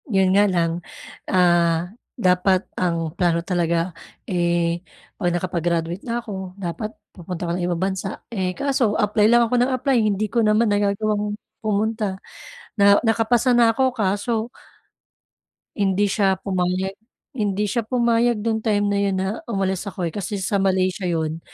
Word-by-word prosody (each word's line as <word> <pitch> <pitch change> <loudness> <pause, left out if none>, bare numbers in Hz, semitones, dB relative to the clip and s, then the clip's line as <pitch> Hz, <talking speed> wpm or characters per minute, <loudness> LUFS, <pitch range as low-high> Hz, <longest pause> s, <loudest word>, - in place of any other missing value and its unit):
'Yun 190 -3 +3
nga 200 +1 +5
lang, 170 -3 +1 0.6
ah, 175 -1 +2 0.2
dapat 185 -2 +2
ang 165 -3 -1
plano 170 -2 +2
talaga, 170 -1 0 0.4
eh, 170 -1 0 0.4
kung 175 -4 0
nakapag-graduate 175 0 -1
na 240 0 -2
ako 190 -4 -7
dapat 195 +4 -4 0.2
pupunta 180 -1 -7
ako 170 - -2
ng 180 - -3
ibang 175 -1 -2
bansa, 190 0 -5
eh, 185 -4 -1
kaso 260 -6 +1
apply 210 0 +2
lang 240 0 +5
ako 230 - -4
nang 250 +2 +2
apply 255 +1 +1
hindi 210 -1 +1
ko 235 +2 +1
naman 215 +1 +3
nagagawang 205 +1 0 0.2
pumunta. 215 -1 -1 0.6
Na 200 0 +6
nakapasa 230 +2 +2
na 230 -1 +5
ako 265 - +1
kaso 220 +2 -1 1.3
Hindi 200 -1 +1
siya 195 -2 +2
pumayag, 185 0 -2 0.4
hindi 210 -4 -1
siya 230 +3 -1
pumayag 235 -2 +2
nung 220 -1 0
time 210 -2 +1
na 200 - +1
'yun 200 -1 +1
na 190 0 -1 0.2
umalis 195 -3 -1
ako, 185 -2 -5
eh, 170 - -1
kasi 205 +3 -4
sa 200 +1 -1
Malaysia 185 0 +1
'yun. 160 -2 -1
195 Hz, 150 wpm, -22 LUFS, 180-220 Hz, 1.3 s, Na